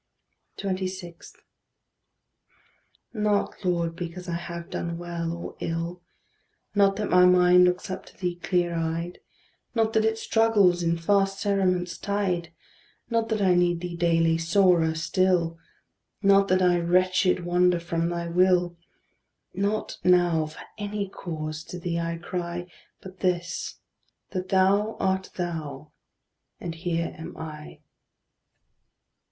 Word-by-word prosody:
26. 185 -3 -5 1.8
Not, 210 -2 0
Lord, 170 -2 0
because 175 +1 -6
I 170 - -3
have 170 0 -6
done 170 0 -3
well 170 -1 -4
or 170 0 -6
ill; 170 +2 -3 0.7
Not 200 -1 +4
that 210 +1 -3
my 180 0 +7
mind 180 0 +6
looks 180 0 0
up 190 0 -6
to - - -17
thee 180 -2 -2
clear 175 -1 0
eyed; 165 +1 -3 0.6
Not 225 -1 +2
that 220 -2 +3
it 220 0 +1
struggles 215 -6 +3
in 170 0 +1
fast 195 +3 +1
cerements 185 -4 0
tied; 185 -4 -1 0.6
Not 230 -1 +1
that 215 -2 0
I 185 -2 +5
need 175 -1 +2
thee 175 -1 -5
daily 165 -1 +2
sorer 170 -2 +3
still; 170 -1 +1 0.6
Not 195 0 +5
that 185 0 +3
I 175 -1 +4
wretched, 185 +1 +2
wander 180 0 +3
from 170 0 -1
thy 170 0 -3
will; 180 0 +3 0.8
Not 200 +2 -2
now 175 -3 +3
for 155 - -11 0.2
any 205 -1 -3
cause 155 -4 -5
to 180 - -7
thee 170 -1 -2
I 170 0 -2
cry, 175 0 -4 0.4
But 185 -1 -11
this, 180 -1 -1 0.6
that 185 -1 -4
thou 200 +3 +3
art 190 0 0
thou, 155 -5 -5 0.7
and 170 - -5
here 170 0 -2
am 160 - -8
I. 155 -1 -9
180 Hz, 130 wpm, -26 LUFS, 170-190 Hz, 1.8 s, my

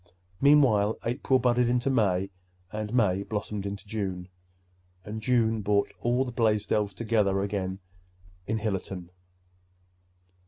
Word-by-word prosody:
Meanwhile 125 -8 +4
April 125 +2 +1
budded 125 -1 +2
into 125 +2 +1
May, 100 -6 +1 0.4
and 110 0 -4
May 100 -6 +2
blossomed 105 -1 -4
into 100 +2 -6
June; 95 -4 -4 0.8
and 110 +1 -5
June 115 -2 +2
brought 100 0 +1
all 125 +2 +1
the 125 - -5
Blaisdells 105 -3 +1
together 105 -4 +1
again 95 -2 -2 0.7
in 110 - 0
Hillerton. 95 -4 -4
105 Hz, 115 wpm, -27 LUFS, 100-120 Hz, 0.8 s, Meanwhile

